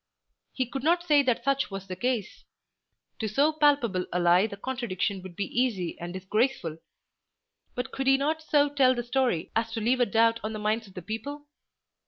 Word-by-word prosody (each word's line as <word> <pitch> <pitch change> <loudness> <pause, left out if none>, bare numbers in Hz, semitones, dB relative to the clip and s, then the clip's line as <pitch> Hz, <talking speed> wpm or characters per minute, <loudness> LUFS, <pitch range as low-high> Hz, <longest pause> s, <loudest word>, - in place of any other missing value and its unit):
He 260 - -1
could 270 +3 -5
not 340 +5 +2
say 300 -4 +5
that 250 -3 0
such 275 +1 +1
was 195 -1 -6
the 185 -1 -6
case. 235 0 -2 0.8
To 220 - -1
so 280 +9 +2
palpable 280 -11 +2
a 180 - 0
lie 175 +4 +4
the 200 -2 -8
contradiction 205 -5 -2
would 185 -2 -10
be 200 - -2
easy 215 -7 -1
and 175 0 -6
disgraceful. 190 - -1 1.0
But 250 +1 -4
could 270 0 -3
he 270 0 +6
not 310 +3 -1
so 295 -2 +3
tell 270 -3 +3
the 240 - -2
story 245 -8 0
as 225 0 0
to 225 - -2
leave 240 +4 +1
a 245 - +3
doubt 230 0 +3
on 215 +1 -3
the - - -4
minds 215 +1 -1
of 190 - -17
the 180 - -7
people? 285 - -6
235 Hz, 200 wpm, -27 LUFS, 195-270 Hz, 1.0 s, he